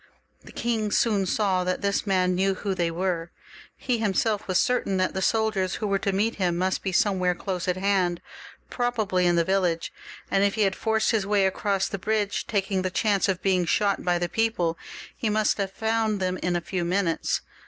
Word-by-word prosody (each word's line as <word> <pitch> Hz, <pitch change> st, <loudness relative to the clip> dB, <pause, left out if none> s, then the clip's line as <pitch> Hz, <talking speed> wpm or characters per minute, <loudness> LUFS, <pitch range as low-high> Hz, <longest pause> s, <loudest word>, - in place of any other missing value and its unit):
The -, -, -13 dB
king 225 Hz, -3 st, -1 dB
soon 205 Hz, -3 st, +1 dB
saw 190 Hz, -2 st, +1 dB
that 185 Hz, +2 st, -2 dB
this 200 Hz, +1 st, 0 dB
man 185 Hz, -2 st, +2 dB
knew 190 Hz, +1 st, +1 dB
who 195 Hz, +1 st, -2 dB
they 175 Hz, -2 st, 0 dB
were. 170 Hz, -1 st, -2 dB, 0.5 s
He 245 Hz, -3 st, -1 dB
himseK 215 Hz, 0 st, 0 dB
was 185 Hz, -2 st, +1 dB
certain 245 Hz, -6 st, +1 dB
that 185 Hz, 0 st, 0 dB
the 190 Hz, -, -2 dB
soldiers 215 Hz, -3 st, +1 dB
who -, -, -4 dB
were 200 Hz, -1 st, +1 dB
to 200 Hz, -, -1 dB
meet 210 Hz, +4 st, 0 dB
him 175 Hz, -3 st, 0 dB
must 185 Hz, +1 st, 0 dB
be 190 Hz, -, -2 dB
somewhere 185 Hz, -2 st, +2 dB
close 185 Hz, -1 st, -4 dB
at 180 Hz, 0 st, 0 dB
hand, 185 Hz, -3 st, +1 dB, 0.5 s
probably 220 Hz, -7 st, 0 dB
in 175 Hz, -, +3 dB
the 170 Hz, -, +3 dB
village; 180 Hz, -3 st, 0 dB, 0.4 s
and 195 Hz, -, +3 dB
if 200 Hz, 0 st, +2 dB
he 215 Hz, -, +2 dB
had 195 Hz, -1 st, +1 dB
forced 220 Hz, -1 st, +1 dB
his 215 Hz, -4 st, 0 dB
way 205 Hz, -1 st, +3 dB
across 195 Hz, 0 st, 0 dB
the 200 Hz, -, -5 dB
bridge, 210 Hz, 0 st, -1 dB
taking 195 Hz, -3 st, 0 dB
the 185 Hz, -, -1 dB
chance 200 Hz, +1 st, +1 dB
of 185 Hz, -1 st, -1 dB
being 185 Hz, -2 st, +2 dB
shot 200 Hz, +4 st, +1 dB
by 175 Hz, -1 st, +2 dB
the 175 Hz, 0 st, -1 dB
people, 180 Hz, -5 st, 0 dB, 0.4 s
he 225 Hz, -, -2 dB
must 215 Hz, 0 st, +1 dB
have 195 Hz, -1 st, -1 dB
found 220 Hz, 0 st, 0 dB
them 185 Hz, -1 st, -1 dB
in 180 Hz, -1 st, -1 dB
a 175 Hz, -, 0 dB
few 180 Hz, +1 st, -3 dB
minutes. 175 Hz, -1 st, 0 dB
195 Hz, 205 wpm, -25 LUFS, 185-210 Hz, 0.5 s, in